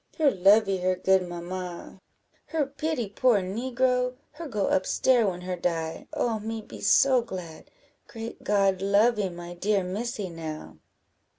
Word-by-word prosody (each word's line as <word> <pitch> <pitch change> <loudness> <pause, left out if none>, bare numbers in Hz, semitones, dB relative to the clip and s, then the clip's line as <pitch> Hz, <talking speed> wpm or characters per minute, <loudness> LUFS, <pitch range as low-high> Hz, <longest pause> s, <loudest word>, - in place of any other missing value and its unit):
her 305 -4 +4
lovee 195 +1 +4
her 185 0 +1
good 185 0 +2
mamma 175 +1 -7 0.5
her 315 -3 0
pity 280 -3 -3
poor 220 +2 +3
negro 250 +5 0 0.2
her 335 - -8
go 210 -7 -1
up 185 - +2
stair 245 -4 +3
when 180 -2 -3
her 180 0 -3
die. 165 -2 -3
Oh, 225 -2 -1
me 225 +1 -4
be 215 - -11
so 260 -2 +5
glad! 180 -8 -8 0.4
great 225 0 -8
God 195 -2 +2
lovee 205 +1 +3
my 175 0 -8
dear 195 +2 0
Missy 205 +2 -3
now!" 160 -3 -8
200 Hz, 150 wpm, -27 LUFS, 180-235 Hz, 0.5 s, so